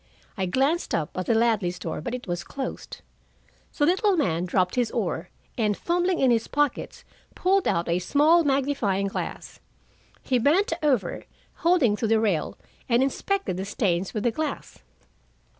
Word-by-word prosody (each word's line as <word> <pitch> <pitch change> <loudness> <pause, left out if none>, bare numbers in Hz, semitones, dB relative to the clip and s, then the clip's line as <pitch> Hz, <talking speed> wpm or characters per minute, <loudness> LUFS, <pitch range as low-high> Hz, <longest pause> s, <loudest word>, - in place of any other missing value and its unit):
I 190 -2 -1
glanced 275 - +1
up 165 0 -2
at 185 - -3
the 230 - +3
Ladleys' 220 -6 +1
door, - - -5
but 245 -1 -3
it 250 - -7
was 175 -3 -3
closed. 275 -1 -6 0.8
The 290 - +3
little 375 +3 +2
man 175 - 0
dropped 180 0 +1
his 245 -3 +1
oar, 180 -5 -3 0.3
and 210 -2 +1
fumbling 350 +1 0
in 260 -2 +3
his 230 -1 +1
pockets, 290 -2 -1 0.3
pulled 385 +1 +2
out 170 +1 0
a 170 +1 +1
small 300 - +4
magnifying 270 -9 0
glass. 195 - -5 0.6
He 255 -2 +1
bent 325 - +3
over, 255 - 0 0.3
holding 330 - +3
to 225 - -1
the 220 0 +3
rail, 200 -8 -1 0.3
and 240 +2 +4
inspected 380 - -1
the 190 - -3
stains 190 -3 -1
with 215 - -3
the 240 - +2
glass. 305 +3 -5
235 Hz, 160 wpm, -25 LUFS, 190-295 Hz, 0.8 s, small